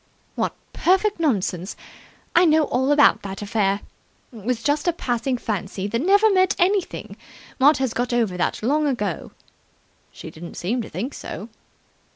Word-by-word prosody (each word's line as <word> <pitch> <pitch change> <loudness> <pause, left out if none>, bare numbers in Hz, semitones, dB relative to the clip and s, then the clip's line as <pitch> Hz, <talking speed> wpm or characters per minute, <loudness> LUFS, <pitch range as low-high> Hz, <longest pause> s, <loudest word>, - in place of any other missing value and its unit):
"What - - -2 0.2
perfect 385 +2 +2
nonsense! 195 - -1 0.6
I 350 - +7
know 315 -1 +4
all 265 -1 0
about 290 0 +5
that 195 +1 -6
affair. 200 -1 0 0.5
It 220 -4 -11
was 235 0 -1
just 295 +3 0
a 345 - +3
passing 250 -3 -1
fancy 200 -4 -4
that 230 +4 -1
never 405 +6 +5
meant 370 0 +3
anything. 375 +1 0 0.4
Maud 290 +4 +6
has 265 -3 -1
got 245 +1 -1
over 230 -6 +1
that 180 - -1
long 295 +5 +2
ago." 210 - -2 0.8
"She - - -10
didn't 170 +2 -10
seem 230 +8 -1
to - - -8
think 225 - -4
so." 220 - -7
245 Hz, 160 wpm, -23 LUFS, 205-305 Hz, 0.8 s, I